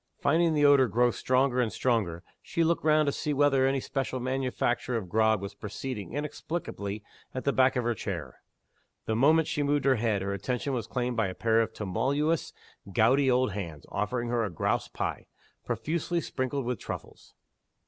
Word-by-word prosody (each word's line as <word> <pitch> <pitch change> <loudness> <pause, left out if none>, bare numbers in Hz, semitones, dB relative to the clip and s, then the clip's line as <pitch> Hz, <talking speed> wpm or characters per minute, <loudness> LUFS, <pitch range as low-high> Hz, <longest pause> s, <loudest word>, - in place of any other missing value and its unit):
Finding 165 +2 +3
the 145 -1 +4
odor 140 -3 +6
grow 120 +3 +3
stronger 130 0 +1
and 115 -3 0
stronger, 100 -9 0 0.2
she 170 - -1
looked 165 +1 +1
round 155 0 +4
to 140 - +1
see 150 +1 -2
whether 135 -2 +4
any 135 0 +1
special 130 -1 -3
manufacture 125 -1 -1
of 100 -5 -5
grog 110 +2 +3
was 100 +1 -6
proceeding 105 +2 -6
inexplicably 140 - -4 0.3
at 130 - -3
the 140 - +1
back 130 0 +4
of 125 - 0
her 120 0 +1
chair. 110 - -6 0.6
The 110 - 0
moment 155 +7 +4
she 150 - -1
moved 145 0 +1
her 135 -2 +4
head, 110 -3 0
her 100 0 -2
attention 125 +7 -2
was 120 -5 -2
claimed 125 -1 -2
by 115 -3 +2
a 95 - -6
pair 115 0 +3
of 110 -1 -1
tremulous 140 - 0 0.4
gouty 130 +7 +4
old 125 -2 +3
hands, 85 -7 -6
offering 120 +4 -2
her 120 -1 +1
a 105 - -1
grouse 85 - -1
pie, - - -4 0.4
profusely 155 +9 -1
sprinkled 130 -3 -3
with 125 -1 -2
truffles. - - -8
125 Hz, 180 wpm, -28 LUFS, 110-140 Hz, 0.6 s, odor